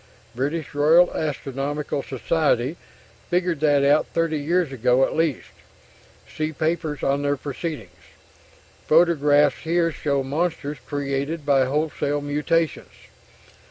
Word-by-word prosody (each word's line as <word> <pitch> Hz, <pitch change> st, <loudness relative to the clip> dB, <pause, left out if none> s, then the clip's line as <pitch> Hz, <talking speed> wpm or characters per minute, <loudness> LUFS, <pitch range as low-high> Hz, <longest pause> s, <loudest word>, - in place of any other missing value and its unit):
British 145 Hz, +6 st, -3 dB
Royal 160 Hz, +5 st, +4 dB
Astronomical 145 Hz, -1 st, -3 dB
Society 135 Hz, 0 st, 0 dB, 0.5 s
figured 175 Hz, -3 st, 0 dB
that 145 Hz, -2 st, +3 dB
out 145 Hz, +2 st, +3 dB
30 165 Hz, -2 st, -1 dB
years 165 Hz, +1 st, 0 dB
ago 125 Hz, +1 st, +2 dB
at -, -, -5 dB
least... 160 Hz, -5 st, -1 dB, 0.8 s
see 155 Hz, 0 st, -3 dB
papers 155 Hz, -2 st, -2 dB
on 140 Hz, +1 st, +1 dB
their 145 Hz, 0 st, 0 dB
proceedings... 130 Hz, -, -6 dB, 0.9 s
photographs 150 Hz, -3 st, +4 dB
here 165 Hz, 0 st, 0 dB
show 140 Hz, -3 st, -1 dB
monsters 150 Hz, +1 st, -2 dB
created 145 Hz, +2 st, -3 dB
by 135 Hz, -2 st, +3 dB
wholesale 145 Hz, +1 st, -1 dB
mutations 150 Hz, +2 st, -2 dB
145 Hz, 110 wpm, -23 LUFS, 140-160 Hz, 0.9 s, Royal